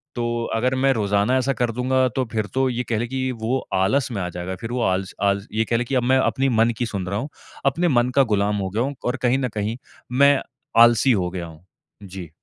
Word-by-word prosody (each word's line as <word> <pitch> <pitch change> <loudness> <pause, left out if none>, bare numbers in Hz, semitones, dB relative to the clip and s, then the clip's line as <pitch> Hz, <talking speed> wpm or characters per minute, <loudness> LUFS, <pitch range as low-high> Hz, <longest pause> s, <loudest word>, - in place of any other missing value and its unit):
तो 120 -1 -1
अगर 125 +3 +1
मैं 135 +1 +3
रोज़ाना 105 +3 +1
ऐसा 135 +1 +1
कर 120 -1 -1
दूँगा, 130 +2 +1
तो 130 +3 -2
फ़िर 110 -1 0
तो 130 0 +2
ये 125 0 -2
कह 115 - +1
ले 120 - -2
कि 130 0 -2
वो 120 +4 0 0.2
आलस 110 +8 +2
में 100 -4 -3
आ 90 - -2
जाएगा। 90 +1 -5
फ़िर 115 +4 -6
वो 125 -1 -1
आलस 95 0 -1
आलस 100 0 +1
ये 110 +1 +1
कह 115 - +2
ले 120 - 0
कि 135 +2 -2
अब 125 - +2
मैं 130 +2 +3
अपनी 135 +1 +1
मन 115 0 +3
की 120 - -1
सुन 100 -5 -4
रहा 100 +2 -2
हूँ। 140 +6 -5 0.4
अपने 165 +6 +2
मन 125 -4 +2
का 135 - +6
गुलाम 105 +1 +1
हो 95 -1 -2
गया 110 +6 -1
हूँ 140 +1 -3
और 125 +2 0
कहीं 125 +2 +3
न 125 -2 -1
कहीं 110 +3 -2 0.4
मैं 140 0 +6 0.4
आलसी 120 +2 +6
हो 90 -4 0
गया 90 -2 -5
हूँ। 80 +2 -15 0.4
जी। 95 -4 -8
120 Hz, 250 wpm, -22 LUFS, 100-130 Hz, 0.4 s, का